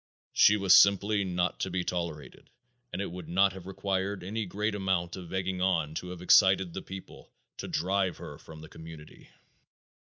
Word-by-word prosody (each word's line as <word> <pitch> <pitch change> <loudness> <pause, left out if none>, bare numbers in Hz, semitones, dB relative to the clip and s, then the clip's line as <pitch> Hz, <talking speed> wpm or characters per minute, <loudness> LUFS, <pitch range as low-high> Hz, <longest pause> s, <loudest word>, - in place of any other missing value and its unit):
She 105 - +5
was 95 -3 +4
simply 100 +1 +4
not 90 -1 -1
to 95 - -2
be 90 0 -2
tolerated 85 -7 -5 0.4
and 100 - -3
it 100 - -6
would 90 -2 -9
not 95 +2 +3
have 95 -1 -10
required 95 0 -3
any 105 +3 -4
great 105 +4 -2
amount 95 -4 -1
of 90 -3 -10
egging 95 -1 -2
on 85 -5 +1
to 90 +3 -5
have 90 -1 -8
excited 95 -2 +5
the - - -5
people 95 0 -11 0.3
to - - -6
drive 95 +2 -1
her - - -10
from 80 -1 -12
the 80 - -10
community. 80 -2 -13
95 Hz, 180 wpm, -29 LUFS, 85-95 Hz, 0.4 s, She